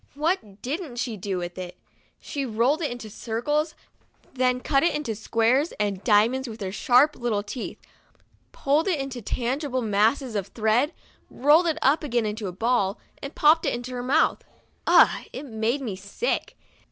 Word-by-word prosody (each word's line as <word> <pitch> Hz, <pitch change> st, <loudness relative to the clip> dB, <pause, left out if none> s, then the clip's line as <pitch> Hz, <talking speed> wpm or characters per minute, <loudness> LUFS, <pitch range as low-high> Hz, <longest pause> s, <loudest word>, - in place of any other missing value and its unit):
What 290 Hz, -, -2 dB
didn't 290 Hz, 0 st, -4 dB
she 240 Hz, -2 st, -3 dB
do 195 Hz, -1 st, -3 dB
with 175 Hz, +1 st, -5 dB
it? 180 Hz, -1 st, -7 dB, 0.4 s
She 285 Hz, -3 st, -4 dB
rolled 250 Hz, +6 st, +1 dB
it 300 Hz, -, 0 dB
into 240 Hz, -2 st, -7 dB
circles, 250 Hz, +9 st, -2 dB, 0.6 s
then 250 Hz, -1 st, +1 dB
cut 275 Hz, +2 st, +2 dB
it 340 Hz, -, +2 dB
into 295 Hz, -7 st, -2 dB
squares 230 Hz, +7 st, +1 dB
and 200 Hz, -2 st, -1 dB
diamonds 235 Hz, +4 st, +3 dB
with 220 Hz, 0 st, -9 dB
her 190 Hz, -1 st, -3 dB
sharp 250 Hz, +8 st, +4 dB
little 225 Hz, -4 st, -1 dB
teeth, 225 Hz, +4 st, -6 dB, 0.7 s
pulled 295 Hz, +6 st, +1 dB
it 380 Hz, -, +2 dB
out 275 Hz, -, -2 dB
into 260 Hz, -3 st, -6 dB
tangled 255 Hz, +3 st, -2 dB
masses 220 Hz, +5 st, +1 dB
of 200 Hz, -2 st, -2 dB
threads, 225 Hz, -, +1 dB, 0.4 s
rolled 300 Hz, +6 st, +4 dB
it 320 Hz, -1 st, 0 dB
up 290 Hz, +4 st, +3 dB
again 240 Hz, -5 st, 0 dB
into 210 Hz, 0 st, -3 dB
a -, -, -4 dB
ball, 205 Hz, 0 st, 0 dB, 0.2 s
and 275 Hz, -, -7 dB
popped 310 Hz, +2 st, +5 dB
it -, -, +1 dB
into 245 Hz, +1 st, -6 dB
her 250 Hz, -1 st, -4 dB
mouth. 280 Hz, +6 st, +2 dB, 0.4 s
Ugh! -, -, +5 dB
It -, -, -6 dB
made 230 Hz, +2 st, -1 dB
me 220 Hz, -7 st, -4 dB
sick 200 Hz, -, -3 dB
245 Hz, 175 wpm, -25 LUFS, 215-285 Hz, 0.7 s, popped